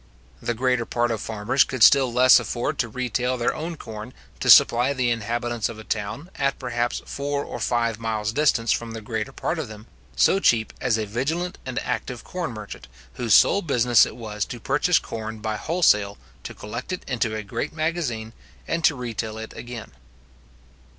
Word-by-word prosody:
The 120 - -2
greater 125 -1 +1
part 120 0 0
of 110 -3 -2
farmers 110 +5 +2
could 130 -4 0
still 130 0 +6
less 125 +2 +7
afford 120 +1 -3
to 120 - +1
retail 125 +1 -1
their 120 - 0
own 165 +1 -5
corn, 110 +1 -8 0.3
to - - -1
supply 125 +4 +7
the 125 -3 0
inhabitants 120 0 -2
of 115 - -8
a 110 - -9
town, 115 - -4
at 140 -1 0
perhaps 120 -2 -2
four 140 0 -3
or - - -6
five 115 -2 0
miles 110 -2 -2
distance 120 -4 +2
from 115 -1 -1
the 115 - -6
greater 110 +3 -4
part 160 +4 -3
of 155 - -3
them, 110 0 -11 0.3
so 70 - +4
cheap 115 - +2
as 125 -4 +2
a 110 - -2
vigilant 150 - -2
and 130 -1 -5
active 125 -3 -4
corn 180 -5 -4
merchant, 105 - -9 0.3
whose 115 -5 +3
sole 200 - +5
business 125 - +4
it - - -9
was 105 -3 -4
to 120 - -7
purchase 155 - +2
corn 110 0 -5
by 110 0 -3
wholesale, 105 - +2 0.3
to - - -7
collect 120 - -6
it 185 - -4
into 115 -4 -1
a 110 - -4
great 105 +8 -4
magazine, 155 -9 -2 0.3
and 165 0 -1
to 160 - +4
retail 115 -3 -4
it 110 0 -7
again. 120 -2 -8
120 Hz, 185 wpm, -24 LUFS, 110-135 Hz, 0.3 s, less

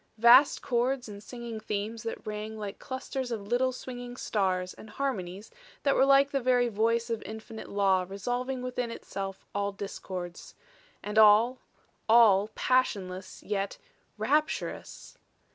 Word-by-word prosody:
Vast 235 +5 +7
chords 250 0 0
and 205 -1 -9
singing 235 0 -7
themes 215 +1 -4
that 225 - -6
rang 215 +1 -5
like 205 -2 -6
clusters 260 -1 -5
of 210 -3 -4
little 250 +3 +2
swinging 245 -1 -8
stars 185 -5 -1
and 215 - -13
harmonies 205 -7 -4 0.3
that 275 - +3
were 270 - +4
like 275 0 +5
the 275 - 0
very 245 -1 +3
voice 230 +2 +1
of 225 - -2
infinite 220 +1 -8
law 195 -2 +2
resolving 245 +6 -3
within 250 -1 -2
itself 195 -4 -6
all 200 0 -1
discords. 185 -3 -7 0.5
And 210 +1 +1
all 220 +4 +6 0.5
all 215 -3 +6
passionless, 195 -7 0
yet 200 -1 -2 0.4
rapturous. 285 +8 -2
225 Hz, 135 wpm, -29 LUFS, 200-250 Hz, 0.5 s, Vast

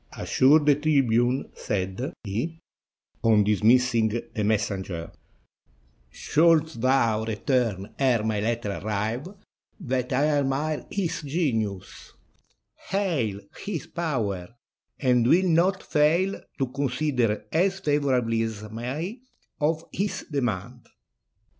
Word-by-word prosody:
"Assure 135 +4 +4
the 145 -1 +4
tribune," 130 -4 +2
said 95 +6 -3
he, 115 +12 -3 0.6
on 110 -2 +5
dismissing 115 +2 +3
the 110 -1 -4
messenger, 100 -5 -1 1.0
"shouldst 160 - +2
thou 115 -4 +2
return 110 -2 -1
ere 125 -5 +3
my 110 -1 0
letter 110 -2 -2
arrive, 110 - -2 0.5
that 125 0 -2
I 135 +3 +2
admire 145 +3 -1
his 185 -5 -2
genius, 115 - -3 0.8
hail 150 - -1 0.2
his 195 -6 -4
power, 115 - -3 0.4
and 125 -3 +2
will 180 +7 +4
not 180 +3 +2
fail 170 +6 +2 0.2
to 135 - 0
consider 130 -4 0
as 190 +4 +1
favorably 130 -7 +1
as 110 -2 -3
I 110 - -9
may 145 - -5 0.4
of 155 +2 0
his 200 +1 -2
demand." 120 -3 -3
125 Hz, 105 wpm, -26 LUFS, 110-150 Hz, 1.0 s, on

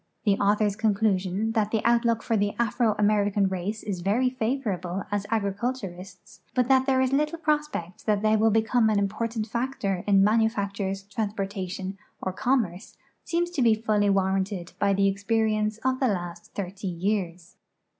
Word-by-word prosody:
The 200 -2 +3
author's 205 0 +2
conclusion 205 -1 +1
that 220 -2 +1
the 220 -1 -1
outlook 235 -1 +2
for 230 - 0
the 205 -1 0
Afro 235 -1 +1
Ameri 205 -1 +2
can 195 0 +2
race 190 +3 -3
is 190 -4 -4
very 235 +8 +1
favorable 220 -7 -2
as 205 -1 -1
agriculturists, 200 -4 -4
but 250 -1 +2
that 265 0 +4
there 260 -1 +3
is 260 0 +1
little 300 +4 +1
prospect 300 - -2
that 210 -1 +2
they 215 0 +4
will 220 +1 +4
become 220 +1 +2
an 215 - +2
important 215 +2 -1
factor 225 -5 -2
in 195 -1 +5
manufactures, 200 -3 0
transporta 200 -2 -3
tion, 190 +2 -6 0.2
or 190 - -3
commerce 220 -5 -1 0.3
seems 345 +1 -1
to 325 -7 -1
be 230 -3 +5
fully 215 -2 +1
warranted 190 -1 0
by 200 - +3
the 195 0 +2
expei'ience 215 +2 +1
of 260 0 +1
the 265 - +2
last 175 -4 -4
thirty 195 0 -5
years. 180 -1 -3
210 Hz, 165 wpm, -26 LUFS, 195-230 Hz, 0.3 s, in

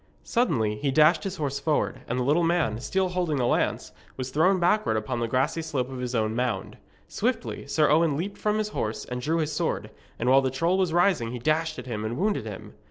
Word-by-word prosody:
Suddenly 120 - +1
he 140 - -1
dashed 155 +5 +4
his 195 -1 -3
horse 140 -5 -2
forward, 150 +1 0
and 125 - -2
the 125 - 0
little 150 +7 +3
man, 165 -10 +1
still 190 +8 0
holding 175 -4 -1
the 125 - +1
lance, - - 0 0.3
was 130 0 -4
thrown 180 +7 +3
backward 175 - +2
upon 120 +3 -3
the 115 - -1
grassy 130 +7 0
slope 135 -5 -3
of 130 - -6
his 125 0 -3
own 110 -1 0
mound. 120 -5 -2 0.3
Swiftly - - -2
Sir 155 -1 +3
Owen 155 -2 +3
leaped 195 +5 -4
from 210 0 +1
his 215 -1 -1
horse 110 - -3
and 125 0 -5
drew 160 +5 0
his 155 -2 -1
sword, 150 -9 -2 0.3
and 120 - -2
while 135 +2 +6
the 130 - 0
troll 165 +8 +1
was 185 -3 +1
rising 175 -9 +2
he - - -3
dashed 155 +5 0
at 125 - -7
him 110 -4 -4
and 110 +3 -3
wounded 205 +4 0
him. - - -8
145 Hz, 230 wpm, -26 LUFS, 125-170 Hz, 0.3 s, while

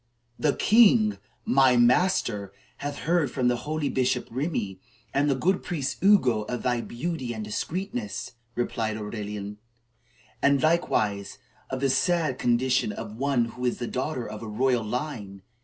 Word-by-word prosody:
"The 150 -2 +2
king, 215 -1 +5 0.3
my 130 -2 +5
master, 120 - +2 0.3
hath 145 0 -4
heard 165 -3 +2
from 125 -1 +1
the 125 - +2
holy 155 -2 -1
Bishop 130 -1 0
Remi 120 - -2 0.3
and 145 +1 +2
the 135 - +3
good 180 +9 +1
priest 140 -3 -3
Ugo 130 - +5
of 125 - -3
thy 125 -1 +1
beauty 125 -1 -4
and 110 -1 -5
discreetness," 120 - -4 0.2
replied 110 -2 -1
Aurelian; 105 -1 -5 0.8
"and 140 0 +4
likewise 105 - +1 0.3
of 130 0 -3
the 135 - +2
sad 165 -5 +1
condition 125 -1 +2
of 105 +1 -7
one 135 -2 +1
who 125 +2 -8
is 125 - 0
the 120 - -3
daughter 130 +1 -3
of 105 0 -7
a 115 - -6
royal 120 +2 +1
line. 105 -5 -5
125 Hz, 150 wpm, -26 LUFS, 110-150 Hz, 0.8 s, king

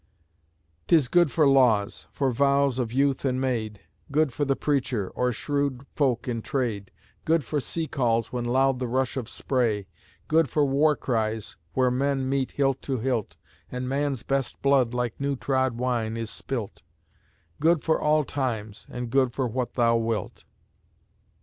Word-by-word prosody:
'Tis 155 -6 +4
good 175 +3 +4
for 150 +3 +3
laws; 115 -6 +3
for 135 -2 0
vows 140 0 +2
of 120 -3 -1
youth 135 +2 +1
and 130 -2 0
maid; 110 -6 -2 0.3
Good 150 -2 +2
for 145 - -1
the 135 0 +1
preacher; 130 -10 -1
or 125 0 0
shrewd 140 +1 -2
folk 125 -5 +1
in 115 -2 -2
trade; 110 -7 -2 0.3
Good 165 -1 +2
for 150 +4 -1
sea 165 +4 -3
calls 115 -6 0
when 120 -1 -2
loud 130 +1 +2
the 125 - -2
rush 130 +1 0
of 125 -4 -4
spray; 115 -7 0 0.4
Good 160 -3 +3
for 150 +3 +2
war 145 +3 +3
cries 110 -4 -2 0.2
where 130 -1 +2
men 135 +1 0
meet 135 -1 -1
hilt 135 -2 +1
to 135 -2 -2
hilt, 115 -8 -2 0.3
And 125 0 -4
man's 140 -2 -1
best 135 -2 -2
blood 135 -4 +3
like 125 -2 -2
new 140 0 0
trod 130 -2 0
wine 120 -3 -1
is 115 -1 -4
spilt, 120 -7 -5 0.8
Good 165 0 +3
for 160 - +1
all 150 0 +3
times, 110 -8 -4
and 125 -1 -5
good 130 -2 +2
for 130 -1 -1
what 120 +1 -3
thou 115 -2 +3
wilt! 115 -1 -3
130 Hz, 165 wpm, -26 LUFS, 115-140 Hz, 0.8 s, Tis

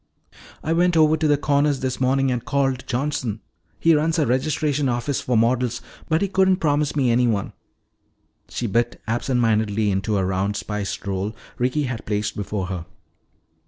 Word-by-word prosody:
I 160 - 0
went 175 0 +3
over 155 0 +5
to 160 0 0
the 145 -1 +4
Corners 145 -1 +1
this 130 0 -2
morning 135 +1 +2
and 125 -1 -2
called 135 -2 0
Johnson 125 -4 -2 0.4
he 165 - +4
runs 160 +2 +2
a 155 - +3
registration 145 +2 0
office 120 +3 -1
for 125 -2 0
models 120 +1 +1 0.3
but 160 +3 +2
he - - +1
couldn't 190 0 +3
promise 150 -4 0
me 130 -5 +2
anyone." 115 -4 +1 1.0
She 120 - -3
bit 120 +2 0
absent 120 +3 0
mindedly 110 -2 +1
into 100 +2 0
a 95 - +1
round 95 +2 -1
spiced 105 -1 -4
roll 100 +2 -2 0.2
Ricky 130 +5 +1
had 125 -4 -5
placed 105 -1 -1
before 100 -1 -3
her. 90 -2 -5
125 Hz, 165 wpm, -22 LUFS, 110-145 Hz, 1.0 s, over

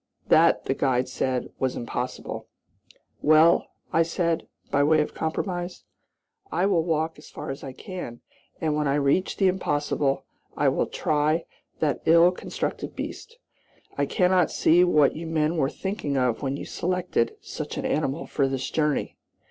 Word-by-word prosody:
That, - - +5
the - - +1
guide 130 -2 +1
said, 130 -1 -2
was 130 -1 0
impossible. 125 +1 -4 0.7
"Well," 155 +2 +5 0.3
said 165 0 0
I, - - -32
by 140 - +3
way 155 +2 +4
of 150 - -1
compromise, 175 +2 -3 0.7
"I 180 - +1
will 185 -5 +3
walk 160 -1 -1
as 150 - -14
far - - -6
as 135 - -8
I 135 - -6
can, 175 - -7 0.4
and 155 -2 0
when 150 -1 0
I 140 - +2
reach 145 +6 +1
the 195 - +2
impossible, 145 -6 0 0.3
I - - +4
will - - 0
try 155 +2 0 0.4
that 145 -5 +1
ill 170 +2 +6
constructed 180 - -4
beast. 470 - -7 0.6
I - - 0
cannot 180 -3 +3
see 175 +3 +4
what 150 -6 +4
you 165 +1 -5
men 160 0 +1
were 135 -3 +2
thinking 175 -5 -3
of 125 -3 +1
when 135 0 -2
you - - -6
selected 180 -8 -1
such - - -6
an - - -3
animal 150 0 -1
for 140 -2 0
this 135 -1 -3
journey." 150 -2 0
155 Hz, 160 wpm, -25 LUFS, 140-175 Hz, 0.7 s, ill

